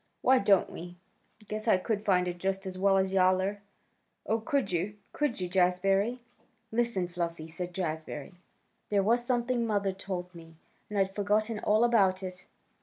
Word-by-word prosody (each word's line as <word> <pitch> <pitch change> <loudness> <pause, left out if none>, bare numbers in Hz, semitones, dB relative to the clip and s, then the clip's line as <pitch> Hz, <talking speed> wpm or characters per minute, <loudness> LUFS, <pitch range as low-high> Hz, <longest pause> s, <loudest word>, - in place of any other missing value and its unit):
"Why 260 0 +5
don't 200 -1 +3
we? 175 +1 -9 0.5
Guess 215 +1 -5
I 215 - +5
could 205 +2 -2
find 180 -3 +2
it 175 0 -4
just 195 +1 -2
as 185 -1 -5
well 195 +1 +3
as 190 0 +1
Yowler." 190 +2 +2 0.6
"Oh, 225 +1 +1
could 275 -3 -1
you? 180 +4 -1 0.2
Could 295 -7 -1
you, 180 - -2
Jazbury?" 195 +5 +2 0.5
"Listen, 225 -6 0
Fluffy!" 170 -2 -4
said 175 +2 -6
Jazbury. 160 -3 -4 0.6
"There 200 -2 +2
was 235 +4 +2
something 240 0 0
mother 205 -3 0
told 185 -2 -5
me, 165 -1 -13 0.3
and 210 - -4
I'd 195 -1 +1
forgotten 210 +2 0
all 215 +2 +3
about 195 -6 +3
it. 180 -1 -7
195 Hz, 165 wpm, -30 LUFS, 180-215 Hz, 0.6 s, Why